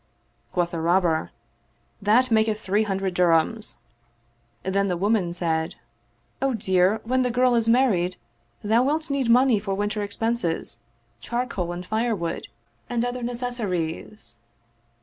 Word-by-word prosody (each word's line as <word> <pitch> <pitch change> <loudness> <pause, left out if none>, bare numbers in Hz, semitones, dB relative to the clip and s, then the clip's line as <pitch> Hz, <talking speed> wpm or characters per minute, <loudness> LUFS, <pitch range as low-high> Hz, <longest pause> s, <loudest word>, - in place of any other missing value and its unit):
Quoth 175 -1 0
the 170 - -3
Robber, 170 -1 +2 0.4
" - - -41
That 245 +4 +4
maketh 220 -1 +2
three 205 +1 +1
hundred 195 -3 -1
dirhams." 180 +5 +2 0.9
Then 200 +1 +1
the 180 -2 -1
woman 200 -2 +1
said, 165 -2 -1 0.3
" 120 - -41
O 270 - +2
my 255 - -1
dear, 190 0 +2
when 255 +3 +1
the 250 - +1
girl 250 +1 +3
is 230 -1 +2
married, 205 -8 +3 0.5
thou 220 +3 +3
wilt 305 +3 0
need 270 -4 0
money 245 -2 +5
for 200 -1 -3
winter 205 +1 -1
expenses, 205 -3 -2 0.4
charcoal 235 -8 -3
and 175 +1 -6
firewood 220 -5 -2 0.4
and 240 0 0
other 245 0 -3
necessaries." 215 - -3
210 Hz, 140 wpm, -24 LUFS, 180-240 Hz, 0.9 s, money